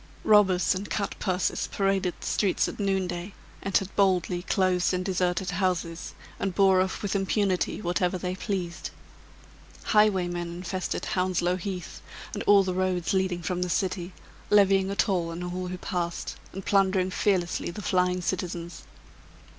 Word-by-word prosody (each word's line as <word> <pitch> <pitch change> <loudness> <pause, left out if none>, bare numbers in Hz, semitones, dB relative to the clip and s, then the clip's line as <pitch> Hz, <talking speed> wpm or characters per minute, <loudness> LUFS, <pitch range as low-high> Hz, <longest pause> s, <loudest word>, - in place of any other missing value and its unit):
Robbers 195 -4 +5
and 190 +2 -5
cut 200 - -1
purses 185 -1 -1
paraded 195 -2 0
the - - -9
streets 195 -3 +1
at - - -7
noonday, 190 -2 -1 0.3
entered 195 0 0
boldly 185 -3 +2
closed 185 -1 +1
and 180 0 -2
deserted 180 -1 0
houses, 175 -2 -2 0.2
and 190 -2 -2
bore 190 -2 +5
off 190 +2 -2
with 200 0 -1
impunity, 195 0 0
whatever 180 +1 0
they 180 0 -3
pleased. 185 -3 -4 0.9
Highwaymen 185 -5 +2
infested 185 +1 -3
Hounslow 180 -2 +1
Heath, 185 -2 -6 0.3
and 205 - -3
all 200 -1 +7
the 185 -1 -2
roads 185 -1 0
leading 190 -2 0
from 180 +1 -2
the 180 - -1
city, 180 0 -1 0.4
levying 195 -2 +4
a 200 - -2
toll 180 -5 +1
on 165 +1 -5
all 180 +1 -4
who 180 0 -5
passed, 175 -1 -3 0.2
and 195 0 -7
plundering 190 -2 +2
fearlessly 180 -3 0
the 200 +4 -7
flying 180 0 +1
citizens. 175 -1 -3
185 Hz, 145 wpm, -27 LUFS, 180-195 Hz, 0.9 s, all